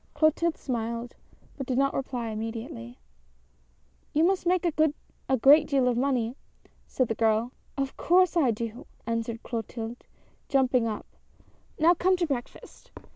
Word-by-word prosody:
" - - -38
Clotilde 315 +1 +2
smiled, 235 -1 -4 0.4
but 270 - -4
did 255 - -1
not 275 0 +2
reply 250 -4 -3
immediately. 220 - -6 0.6
" - - -38
You 310 - +4
must 365 0 +2
make 360 0 +2
a 310 -4 -1
great 290 +5 +6
deal 270 -3 +2
of 245 - +2
money," 245 -2 0 0.5
said 255 - 0
the 225 - -1
girl. 225 +2 +1
" - - -37
Of 275 -1 -2
course 365 +1 +3
I 305 -7 +4
do! 230 +1 -4
" - - -34
answered 230 0 -3
Clotilde, 230 0 -5 0.5
jumping 260 -3 +3
up; 215 -2 -4 0.7
"now 330 +3 +5
come 370 +2 +2
to 350 - +1
breakfast!" 270 -6 -6
250 Hz, 155 wpm, -27 LUFS, 225-300 Hz, 0.7 s, great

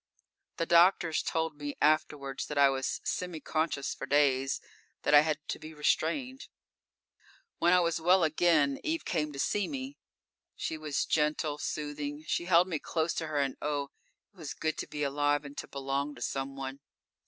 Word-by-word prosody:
_ - - -50
The 165 - 0
doctors 170 -1 +4
told 160 -2 -2
me 145 -1 -5
afterwards 150 -3 +1
that 150 - -5
I 140 -1 +7
was 135 -1 -2
semi 180 -3 -3
conscious 155 -3 -1
for - - -7
days; 135 -2 +2 0.4
that - - +2
I 145 - +10
had 155 +1 +1
to - - -3
be 155 0 -10
restrained. 250 - 0 1.1
_When 175 - +5
I 180 0 +6
was 170 -1 0
well 180 +2 +5
again, 155 -3 +3
Eve 320 +1 -2
came 150 -3 -1
to 140 - -9
see 200 +7 0
me. 270 0 -6 0.6
She - - -3
was 155 -2 -2
gentle 150 -1 0
soothing. 145 0 -4
She 170 - -1
held 175 0 +5
me 165 -5 -2
close 160 +2 -1
to 160 - -3
her 155 -1 -3
and 135 -2 0
oh! 145 -2 -2 0.4
it - - -29
was 160 -5 -6
good 155 0 -1
to - - -4
be 150 -1 -4
alive 145 +1 +1
and 140 0 -9
to - - -6
belong 140 +1 -3
to - - -13
someone. 135 0 -4
150 Hz, 180 wpm, -30 LUFS, 145-165 Hz, 1.1 s, I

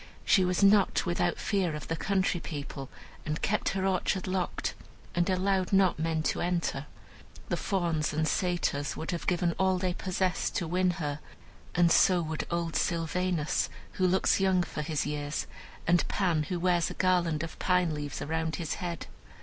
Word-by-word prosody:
She 190 - +5
was 180 +2 +1
not 200 0 +5
without 175 -1 0
fear 185 -6 0
of 150 - -7
the 165 - -1
country 190 0 0
people, 140 -4 -6 0.3
and 150 +1 -3
kept 210 +1 0
her 190 - 0
orchard 190 0 0
locked, 185 -1 -2 0.4
and 175 +2 +1
allowed 190 0 +1
not 195 -4 +4
men 160 -1 0
to - - 0
enter. 170 -5 -1 0.6
The - - 0
Fauns 170 -5 0
and 155 +1 0
Satyrs 175 -6 0
would 160 - -3
have 175 - -4
given 175 -1 +2
all 190 -1 +3
they 180 -1 -1
possessed 185 0 -1
to 170 - -1
win 180 +2 +2
her, 145 -3 -3 0.6
and 170 -1 +4
so 180 +1 +5
would 155 0 -4
old 170 -1 -2
Sylvanus, 170 -1 0 0.2
who 185 -2 +1
looks 190 +2 +3
young 190 -2 +3
for 155 - -5
his 150 -1 -1
years, 145 0 -2 0.4
and 175 0 +3
Pan, 170 -6 +1
who 180 - -1
wears 175 -1 +2
a - - -7
garland 175 -4 +2
of 165 - -7
pine 180 -3 +2
leaves 145 -1 -4
around 160 +1 -1
his 165 -3 -3
head. 170 -2 -4
175 Hz, 175 wpm, -29 LUFS, 160-185 Hz, 0.6 s, She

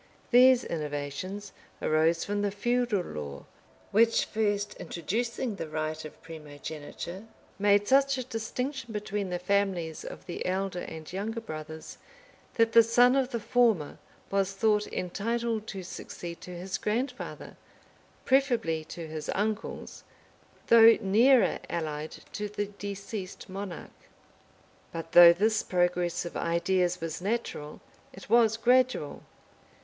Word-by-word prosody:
These 250 0 +7
innovations 155 +6 -4 0.3
arose 160 +2 +2
from 205 0 -1
the 205 - +1
feudal 235 0 0
law; 70 - -7 0.5
which, 230 +3 +4
first 205 -1 -1
introducing 230 - -3
the 165 - -4
right 155 0 -3
of 155 - -10
primogeniture, 160 +4 -8 0.3
made 205 0 +4
such 275 0 +4
a 255 - -2
distinction 245 +2 -4
between 205 -2 -3
the 180 - -1
families 180 -3 -1
of - - -9
he 175 - -5
elder 190 0 -2
and 160 0 -8
younger 215 +4 -3
brothers, 155 -6 -8 0.6
that 230 -1 +3
the 230 - +8
son 245 +3 +4
of 265 -2 +1
the 235 - -3
former 225 -10 +1 0.3
was 195 -1 +1
thought 210 +1 +2
entitled 220 +4 -2
to 190 -2 -6
succeed 170 -1 -8
to 180 -1 -8
his 190 +2 -4
grandfather, 245 +4 -3 0.7
preferably 240 - +2
to 170 +1 -7
his 155 -1 -6
uncles, 215 +2 -3 0.6
though 230 0 +8
nearer 235 +6 +4
allied 155 -2 -4 0.2
to 210 0 -3
the 205 0 -2
deceased 200 -1 -7
monarch. 190 -2 -6 1.0
But 165 0 -6
though 175 -1 +10
this 215 +5 +2
progress 175 -1 0
of 170 - -7
ideas 180 +1 +1
was 165 +1 -4
natural, 195 -8 -3 0.3
it 195 +2 -13
was 225 -2 +5
gradual. 245 - +2
200 Hz, 125 wpm, -28 LUFS, 170-225 Hz, 1.0 s, though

